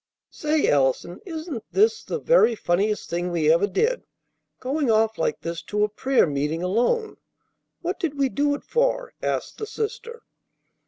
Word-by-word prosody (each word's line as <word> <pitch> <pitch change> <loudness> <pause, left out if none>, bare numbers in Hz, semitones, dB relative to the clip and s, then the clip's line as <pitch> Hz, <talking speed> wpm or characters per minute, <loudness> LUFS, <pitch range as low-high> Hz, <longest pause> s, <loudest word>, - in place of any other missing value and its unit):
"Say, 305 0 0
Allison, 140 +5 +1
isn't 315 - -5
this 440 +2 +3
the - - -3
very 480 - +4
funniest 205 +2 0
thing 175 +1 -2
we 160 -3 +3
ever 170 +5 +2
did, 460 - 0 0.6
going 275 +1 -1
off 220 0 +2
like 155 - -1
this 170 0 -4
to 210 0 0
a 210 - +2
prayer 260 +5 +2
meeting 150 +2 -2
alone? 245 - 0 0.7
What 355 +3 -2
did 320 -6 -2
we 275 -1 +3
do 285 +2 +1
it - - -9
for?" - - 0
asked - - -3
the 430 - -4
sister. 470 +2 -5
255 Hz, 160 wpm, -24 LUFS, -, 0.7 s, very